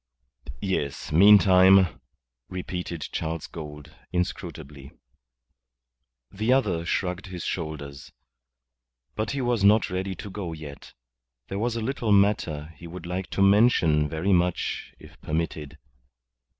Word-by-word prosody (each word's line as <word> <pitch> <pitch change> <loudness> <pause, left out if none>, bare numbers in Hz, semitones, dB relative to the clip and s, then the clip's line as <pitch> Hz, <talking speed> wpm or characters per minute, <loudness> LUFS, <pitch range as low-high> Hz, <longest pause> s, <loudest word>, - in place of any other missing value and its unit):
"Yes, 70 +1 -2
meantime," 95 0 +6 0.5
repeated 90 -2 -5
Charles 80 0 -3
Gould, 75 -1 -9 0.2
inscrutably. 75 -6 -5 1.4
The 110 +5 -1
other 105 -11 +1
shrugged 90 +1 -2
his 90 -3 -7
shoulders. 75 -5 -5 1.0
But 110 0 -3
he 140 - -2
was 120 -4 0
not 105 0 +4
ready 95 +1 -3
to 100 +3 -8
go 95 -4 -5
yet. 75 -3 -10 0.6
There 100 - -3
was 115 +1 -1
a 115 - -2
little 115 -2 -2
matter 90 -7 +2
he 85 - -9
would 85 +1 -9
like 90 +2 -4
to 100 - +1
mention 95 -8 +4
very 80 +6 0
much 90 -1 -1
if - - -16
permitted. 80 -2 -3
90 Hz, 120 wpm, -25 LUFS, 80-100 Hz, 1.4 s, meantime